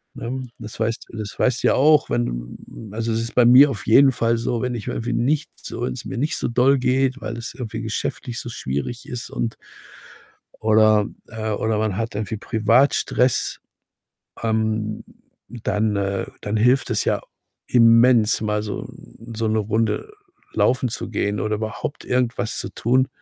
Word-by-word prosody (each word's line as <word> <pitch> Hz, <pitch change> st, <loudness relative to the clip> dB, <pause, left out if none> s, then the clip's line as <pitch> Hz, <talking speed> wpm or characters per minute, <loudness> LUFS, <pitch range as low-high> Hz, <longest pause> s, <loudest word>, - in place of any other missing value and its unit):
Ne? 130 Hz, +2 st, -5 dB
Das 110 Hz, 0 st, -9 dB
weißt 110 Hz, 0 st, -2 dB
d 115 Hz, -, -9 dB
das 105 Hz, -1 st, -6 dB
weißt 125 Hz, -1 st, +1 dB
du -, -, +4 dB
ja -, -, +4 dB
auch, 150 Hz, +2 st, +4 dB
wenn, -, -, -2 dB
mm, 110 Hz, -, -11 dB
also 115 Hz, +1 st, -2 dB
es 115 Hz, +1 st, 0 dB
ist 115 Hz, -, -5 dB
bei 125 Hz, -, +5 dB
mir 130 Hz, +4 st, +8 dB
auf 110 Hz, -9 st, -5 dB
jeden 135 Hz, +4 st, +7 dB
Fall 115 Hz, -2 st, +1 dB
so, 115 Hz, 0 st, -2 dB
wenn 125 Hz, -1 st, -2 dB
ich 110 Hz, -4 st, -6 dB
irgendwie 120 Hz, +2 st, -2 dB
nicht 145 Hz, +5 st, 0 dB
so -, -, -8 dB
wenn's 125 Hz, 0 st, -4 dB
mir 125 Hz, -, -5 dB
nicht 150 Hz, +5 st, -1 dB
so -, -, -1 dB
doll 125 Hz, +4 st, +3 dB
geht, 130 Hz, +1 st, +1 dB
weil 115 Hz, -, -5 dB
es 115 Hz, -, -6 dB
irgendwie 115 Hz, -2 st, -6 dB
geschäftlich 115 Hz, +2 st, -4 dB
so 120 Hz, -, -6 dB
schwierig 70 Hz, -, -4 dB
ist 125 Hz, -1 st, -5 dB
und 115 Hz, -1 st, -3 dB, 1.0 s
oder, 110 Hz, -1 st, +4 dB, 0.2 s
äh, 110 Hz, -1 st, -4 dB
oder 110 Hz, +1 st, 0 dB
man 105 Hz, -3 st, -1 dB
hat 115 Hz, -1 st, -3 dB
irgendwie 105 Hz, 0 st, -3 dB
privat 115 Hz, +6 st, +3 dB
Stress. 125 Hz, -1 st, +1 dB, 0.8 s
Ähm, 110 Hz, -1 st, -1 dB, 0.5 s
dann 110 Hz, -2 st, -1 dB
äh, 100 Hz, -1 st, -1 dB, 0.2 s
dann 105 Hz, +1 st, -2 dB
hilft 125 Hz, +5 st, +3 dB
es -, -, +1 dB
ja -, -, +1 dB, 0.5 s
immens, 115 Hz, -2 st, +5 dB
mal 105 Hz, -1 st, -1 dB
so, 105 Hz, -, -4 dB
mm, 115 Hz, +1 st, -13 dB
so 115 Hz, 0 st, -1 dB
'ne 110 Hz, 0 st, +1 dB
Runde 110 Hz, -, -1 dB, 0.4 s
laufen 125 Hz, +4 st, +2 dB
zu -, -, -5 dB
gehen 105 Hz, 0 st, -1 dB
oder 110 Hz, 0 st, 0 dB
überhaupt 110 Hz, +6 st, -5 dB
irgendwas 125 Hz, -2 st, -1 dB
zu -, -, -4 dB
tun 130 Hz, +3 st, +2 dB
115 Hz, 180 wpm, -22 LUFS, 110-125 Hz, 1.0 s, mir